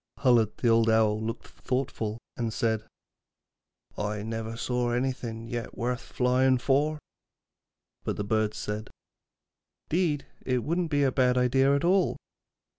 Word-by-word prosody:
Hullad, 120 -5 +4
the 120 -2 +3 0.2
Owl, 110 -1 +2
looked 115 +1 -4
thoughtful, 125 -4 -3 0.2
and 115 -2 -2
said: 110 -1 0 1.2
'I 105 0 -2
never 115 0 -4
saw 125 0 0
anything 120 -3 -2
yet 120 0 -5
worth 120 +1 -1
flying 130 +1 +2
for.' 145 +4 +1 1.1
But - - -2
the 105 - -1
birds 110 +1 0
said: 105 +1 -4 1.0
''Deed, 160 -4 +1 0.2
it 125 -2 0
wouldn't 170 +1 0
be 145 -2 +2
a 135 - +3
bad 125 -1 +3
idea 135 +2 +4
at 140 - 0
all.' 185 0 +3
125 Hz, 130 wpm, -28 LUFS, 110-135 Hz, 1.2 s, Hullad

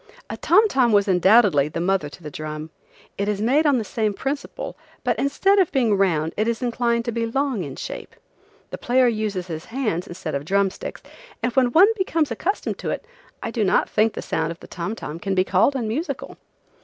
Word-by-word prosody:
A - - -5
tom 415 +6 +4
tom 255 - +2
was 205 -1 +4
undoubtedly 185 -5 +5
the 160 +2 -5
mother 180 -3 0
to 170 - -14
the 150 - -7
drum. 155 +1 -6 0.5
It 200 - 0
is 210 -1 -1
made 275 +8 +3
on 280 -3 +4
the 230 - -1
same 215 -1 -1
principle, 275 +5 -4 0.3
but - - 0
instead 390 +9 +3
of 370 - +3
being 240 -7 +2
round 165 -5 +1
is 225 +3 -1
inclined 235 -1 0
to 235 - -1
be 230 0 -1
long 265 -4 -1
in 140 -3 -7
shape, - - -7 0.6
The - - -6
player 250 +1 +3
uses 215 -5 -1
his 160 -3 -6
hands 220 -8 -2
instead 175 -3 -6
of 140 0 -2
drum 195 +4 +2
sticks, - - -8 0.4
and 235 +2 -1
when 255 -2 +3
one 370 - +7
becomes 330 -7 0
accustomed 395 +4 -2
to - - -4
it - - -3 0.4
I - - -3
do 230 -2 0
not 190 - +2
think 220 +1 +2
the - - -6
sound 160 0 -1
of 170 - -8
a - - -8
tom 190 +5 -4
tom 160 -6 -7
can 195 +2 -2
be 185 - +4
called 195 +9 +2
unmusical. 255 +7 -3
215 Hz, 210 wpm, -23 LUFS, 180-255 Hz, 0.6 s, one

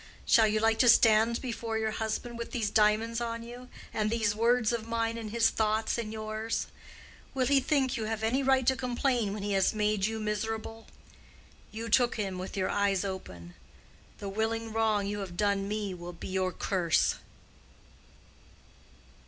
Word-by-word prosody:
Shall 225 -1 +5
you 215 0 +1
like 220 0 +2
to 245 - +6
stand 225 +1 +5
before 230 -2 -3
your 220 0 -1
husband 220 +2 -4
with 235 - -5
these 220 -4 -2
diamonds 220 +2 +2
on 230 0 -3
you, 245 +2 -10 0.2
and 215 -1 0
these 220 -2 +1
words 235 +1 +2
of 230 -1 -3
mine 230 0 -1
in 225 -2 -6
his 225 +1 +2
thoughts 220 0 0
and 215 -2 -4
yours? 220 +1 -3 0.7
Will 260 -1 +1
he 275 +1 +4
think 270 -1 +1
you 220 - -3
have 220 0 -3
any 240 +5 +1
right 265 -1 +3
to 265 - +3
complain 245 -3 0
when 205 0 -5
he 205 - -2
has 195 +2 +2
made 210 -1 +1
you 220 0 -4
miserable? 220 +1 -4 0.8
You 225 +2 -5
took 240 +2 +3
him 195 -4 -3
with 185 +2 -6
your 185 - 0
eyes 200 -1 +1
open. 90 - -7 0.6
The 200 - -7
willing 220 +2 -2
wrong 220 -2 +1
you 205 +1 -3
have 185 -3 -7
done 200 -1 +1
me 210 -2 -3
will 175 0 -8
be 170 - -8
your 185 -1 0
curse. 180 -4 +1
220 Hz, 175 wpm, -29 LUFS, 205-230 Hz, 0.8 s, to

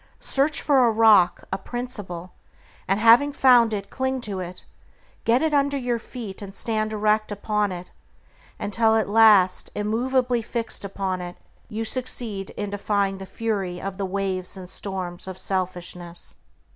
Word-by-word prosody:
Search 285 +3 0
for 275 -4 +4
a - - +3
rock, 215 -5 +5
a 190 - -1
principle, 200 -7 -6 0.5
and 195 +2 +1
having 235 +6 +6
found 250 -5 +5
it 200 -2 -4
cling 260 0 -1
to 205 -5 -4
it; 180 0 -7 0.6
get 240 +5 +3
it 315 -1 +1
under 280 0 +2
your 245 -3 -1
feet 220 -5 -8
and 195 -1 -8
stand 215 -1 -1
erect 215 0 +1
upon 205 0 0
it, 180 0 -7 0.7
until 220 +2 +2
at 220 - +2
last, 205 -4 +5
immovably 245 +3 +1
fixed 230 -1 -4
upon 190 -2 -3
it, 175 0 -7 0.3
you 225 0 -3
succeed 225 -5 -2
in 205 -1 -3
defying 200 -1 0
the 190 - -8
fury 195 -6 -2
of 195 +1 -6
the 195 - 0
waves 190 -1 -2
and 185 -1 -9
storms 185 -3 -5
of 190 -1 -6
selfishness. 180 -2 -4
210 Hz, 155 wpm, -24 LUFS, 190-235 Hz, 0.7 s, having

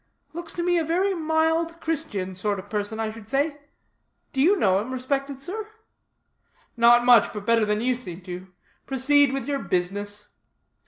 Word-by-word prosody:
Looks 340 +1 -7
like 350 0 +1
a 330 - +1
very 365 +5 +1
mild 320 0 0
Christian 280 - -2
sort 200 +2 -2
of 195 +2 -10
person, 210 +1 -2
I 220 -1 -1
should 220 -1 -12
say. 285 +2 0 0.7
Do 265 - +1
you 380 +8 +5
know 190 - +3
him, 225 +5 -5
respected 275 +1 -3
sir?" 425 +5 -5 1.1
"Not 240 0 +5
much, 245 -3 +6
but 210 -2 -7
better 230 -1 +3
than 210 +1 0
you 255 +2 +2
seem 190 -8 -5
to. 180 +1 -8 0.4
Proceed 280 +1 +4
with 270 -3 -3
your 280 0 -1
business." 205 +3 -2
255 Hz, 165 wpm, -25 LUFS, 210-320 Hz, 1.1 s, much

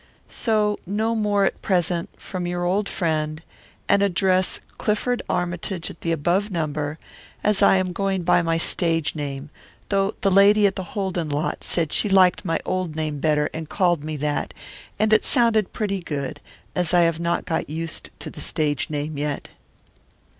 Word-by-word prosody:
So 210 -2 +1
no 215 +4 0
more 205 -3 +2
at - - -2
present, 175 -2 0
from 180 -2 -4
your 175 0 -2
old 200 +3 +1
friend, 155 -3 -1 0.5
and 200 0 +4
address 185 -1 +2 0.2
Clifford 240 +4 0
Armytage 175 0 -2
at - - -15
above 170 +5 +1
number, 155 -4 -2 0.5
as 210 -1 +2
I - - +6
am 185 -1 -1
going 195 0 -1
by 175 0 +4
my 165 -1 +1
stage 165 -1 0
name, 145 -1 -5 0.4
though 195 0 +1
the 195 - +2
lady 200 +2 +6
at 195 -1 +2
the - - -3 0.2
Holden 185 -5 -1
lot 145 +3 -2
said 165 -4 -1
she 210 - +1
liked 190 -1 +5
my 165 -4 0
old 185 -4 -2
name 155 -2 -2
better 150 0 +2
and 160 -1 -6
called 175 -6 +1
me 155 0 -4
that, 145 +1 -2 0.4
and 215 +1 +2
it 215 - +5
sounded 230 -5 +2
pretty 200 -3 -2
good, 145 -2 -4 0.3
as 180 -1 0
I 175 - +6
have 165 -1 +2
not 170 0 -1
got 160 -3 -2
used 160 +1 -4
to - - -6
the - - -9
stage 145 -3 0
name 150 0 -3
yet. 145 -1 -3
175 Hz, 170 wpm, -23 LUFS, 155-195 Hz, 0.5 s, I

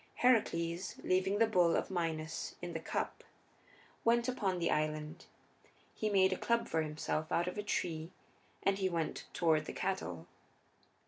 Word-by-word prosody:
Heracles, 175 -8 +2
leaving 190 +2 +2
the 225 - +5
bull 180 -6 +4
of - - -1
Minos 165 -3 -2
in 175 -1 -5
the 165 - -2
cup, - - -3 0.8
went 235 +1 +3
upon 200 -7 0
the 170 -1 +1
island; 155 +2 -2 0.7
he 215 - -1
made 190 -2 +4
a - - -3
club 235 0 +1
for 160 - +1
himself 155 0 -2
out 170 +1 +2
of 180 - -3
a 210 - -2
tree 165 -5 -2 0.5
and 195 0 +2
he 190 -1 +2
went 165 -3 -2
toward 160 -3 +2
the - - -5
cattle. 90 - -2
175 Hz, 155 wpm, -34 LUFS, 160-195 Hz, 0.8 s, the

